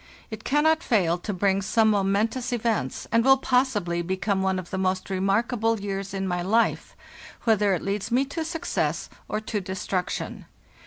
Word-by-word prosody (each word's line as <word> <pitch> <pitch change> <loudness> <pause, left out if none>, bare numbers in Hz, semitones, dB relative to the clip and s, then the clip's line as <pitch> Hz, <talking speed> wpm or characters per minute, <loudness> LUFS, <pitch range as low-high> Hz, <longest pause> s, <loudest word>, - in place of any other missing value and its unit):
It 220 0 -7
cannot 310 +3 +3
fail 180 - +2
to 205 - -4
bring 195 0 +1
some 220 +3 +3
momentous 210 +5 0
events, 225 - -1
and 230 0 +4
will 270 +1 +6
possibly 250 -10 +1
become 190 +2 -1
one 190 0 +1
of 185 -1 -6
the 190 - -2
most 185 0 -1
remark 195 +6 +1
able 225 -1 +1
years 195 -1 -4
in 195 0 -2
my 175 -1 -1
life, 220 +6 +1 0.5
whether 210 -4 +3
it 170 - -5
leads 200 +2 -2
me 250 +3 +2
to 320 +4 -4
success 325 +2 -2 0.2
or 215 - -1
to 215 -1 -3
destruction. 185 0 -3
205 Hz, 170 wpm, -25 LUFS, 190-235 Hz, 0.5 s, will